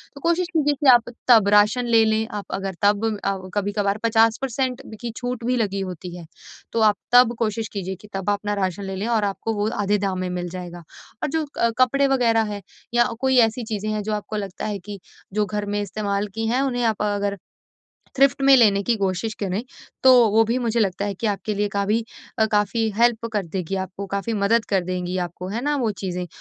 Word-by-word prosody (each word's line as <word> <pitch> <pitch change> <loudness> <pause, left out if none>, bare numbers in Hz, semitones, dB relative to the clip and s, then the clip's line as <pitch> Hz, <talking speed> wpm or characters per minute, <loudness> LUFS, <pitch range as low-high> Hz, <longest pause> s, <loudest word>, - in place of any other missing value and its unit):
तो 280 - -11
कोशिश 340 +3 +1
कीजिए 295 -3 +2
कि 290 - +1
आप 240 -1 +3 0.2
तब 225 -5 +6
राशन 210 +4 +3
ले 225 -1 +6
लें, 220 0 +1
आप 205 -2 -6
अगर 195 0 -4
तब 205 +2 +3 0.2
अ, 195 -1 0 0.3
कभी-कभार 205 -1 0
50% 230 +3 +1 0.2
की 235 -1 -4
छूट 245 -1 -4
भी 250 +1 +1
लगी 200 -4 -1
होती 180 -1 -6
है। 175 -2 -9 0.5
तो 230 - -1
आप 210 -1 +5 0.2
तब 245 -1 +6
कोशिश 225 -1 -1
कीजिए 190 -2 -4
कि 210 - -13
तब 195 0 -2
अपना 205 0 -2
राशन 195 -1 -2
ले 195 0 -5
लें, 200 +4 -3
और 230 -3 +1
आपको 205 +3 -2
वो 205 +1 0
आधे 205 +1 +2
दाम 195 -2 -2
में 185 0 -2
मिल 180 -1 -4
जाएगा। 175 -1 -8 0.4
और - - 0
जो 320 +1 -1
क 235 - +2
कपड़े 275 +2 +4
वगैरह 235 -4 +3
हैं 205 - -6 0.3
या 240 0 +5
अ, 240 - -3
कोई 265 -1 +3
ऐसी 225 +2 -5
चीज़ें 215 -1 -3
हैं, 215 0 -1
जो 215 +1 -2
आपको 210 +1 -4
लगता 195 -3 -5
है 210 -2 -3
कि 200 +1 -9 0.3
जो 210 0 +1
घर 210 0 -3
में 205 0 -2
इस्तेमाल 205 0 -2
की 225 0 -2
हैं, 250 +4 +1
उन्हें 245 -3 -1
आप 220 -2 0
अ, 205 -1 0
अगर 200 0 -2 0.8
थ्रिफ्ट 275 0 +4
में 275 0 +7
लेने 205 -5 +4
की 235 +4 +1
कोशिश 195 +2 -2
करें, 195 +2 -2 0.4
तो 260 0 +8 0.2
वो 220 +2 +5
भी 230 +3 0
मुझे 235 -2 0
लगता 200 -1 0
है 205 -1 -2
कि 225 - -3
आपके 210 +1 -2
लिए 205 +1 0
काभी 205 +3 0 0.3
अ, 220 - +4
काफ़ी 210 +2 +1
हेल्प 235 0 +2
कर 205 -4 -1
देगी 185 +2 -4
आपको, 190 +1 -5
काफ़ी 200 +4 -3
मदद 220 +2 +2
कर 190 -3 +1
देंगी 180 0 -3
आपको 180 +2 -8
है 215 +4 -3
ना? 295 0 +1
वो 240 -5 0
चीज़ें। 180 -2 -3
210 Hz, 225 wpm, -22 LUFS, 195-235 Hz, 0.8 s, तो